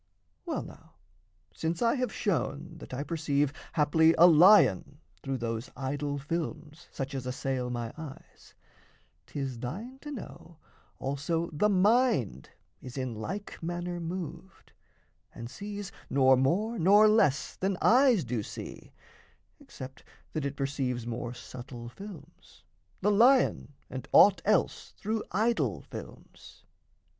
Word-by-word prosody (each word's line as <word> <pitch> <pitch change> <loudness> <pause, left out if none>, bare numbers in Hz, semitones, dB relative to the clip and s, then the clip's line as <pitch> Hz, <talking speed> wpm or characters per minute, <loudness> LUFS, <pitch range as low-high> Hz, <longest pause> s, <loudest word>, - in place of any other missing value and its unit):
Well, - - -2
now, - - -14 0.6
since 160 - -2
I 230 - +4
have 255 -2 -1
shown 170 -4 -2
that - - -11
I 130 +2 -3
perceive 145 -3 0 0.2
Haply 160 +2 +4
a 170 - +8
lion 165 - +6 0.2
through 135 -1 -3
those 115 0 -4
idol 145 +1 -2
films 155 +1 -5
Such 135 +1 -5
as 130 -2 -4
assail 125 -1 -2
my 120 -2 -4
eyes, 155 -4 -12 0.7
'tis 135 -4 -4
thine 215 - -6
to 295 - -9
know 190 - -9 0.4
Also 150 +5 -2
the 210 +8 +2
mind 200 - +2 0.3
is 125 +1 -9
in 130 -2 -2
like 190 - -6
manner 175 +1 -3
moved, 175 +2 -7 0.6
And 115 +1 -7
sees, 205 +1 -6 0.2
nor 130 -1 +5
more 195 - +1
nor 205 +5 +6
less 150 -11 +2
than 190 0 -1
eyes 250 -5 +5
do 120 -2 -2
see - - -9 0.7
(Except 130 0 -10 0.3
that 155 -3 -2
it 140 0 -3
perceives 135 -4 -2
more 120 +1 -4
subtle 120 -1 -9
films) 170 - -13 0.4
The 205 +2 +3
lion 240 - +4
and 130 0 -7
aught 200 -1 +7
else 210 -3 +1
through 220 +1 -2
idol 170 - 0
films. - - -12
155 Hz, 130 wpm, -29 LUFS, 130-195 Hz, 0.7 s, a